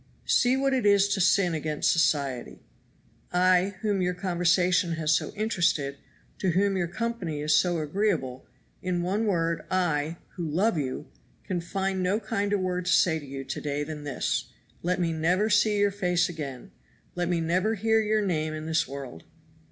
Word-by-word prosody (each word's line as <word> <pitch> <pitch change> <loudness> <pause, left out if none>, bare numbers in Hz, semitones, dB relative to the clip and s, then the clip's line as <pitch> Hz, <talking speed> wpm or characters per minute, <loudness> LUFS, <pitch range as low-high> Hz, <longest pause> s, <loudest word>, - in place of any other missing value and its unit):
See 250 +1 +3
what 270 0 +1
it 260 - +1
is 200 -1 +5
to 200 -1 0
sin 180 -1 +3
against 155 -1 0
society. 140 -6 0 0.7
I, 185 +2 +3
whom 205 -3 0
your 180 0 0
conversation 180 -1 +2
has 160 -1 0
so - - 0
interested, 165 -10 0 0.4
to 190 - 0
whom 195 +2 +2
your 175 -2 0
company 200 -5 -3
is 150 +1 +2
so 175 -2 +2
agreeable 155 -5 -1 0.3
in 180 -2 -1
one 205 +5 0
word, 170 -4 0
I, 165 -3 0 0.2
who 175 - -3
love 190 +8 +1
you, 140 -1 -3 0.4
can 180 -4 -3
find 190 +2 -2
no 185 +4 +1
kinder 205 -2 -1
word 180 -1 -2
to - - +2
say 160 -3 +3
to 145 - -11
you 135 0 -6
to - - -5
day 145 0 -2
than 150 0 -7
this 145 -3 -1 0.4
let 180 +2 0
me 170 -2 0
never 180 +7 +1
see 210 0 +3
your 205 0 +3
face 180 -3 +1
again 140 -7 -7 0.4
let 175 -1 -2
me 175 -1 +1
never 185 +7 +1
hear 220 +2 +2
your 215 -1 +1
name 155 -4 -1
in 155 0 -6
this 160 0 +1
world!" 135 -10 -8
180 Hz, 175 wpm, -27 LUFS, 155-200 Hz, 0.7 s, is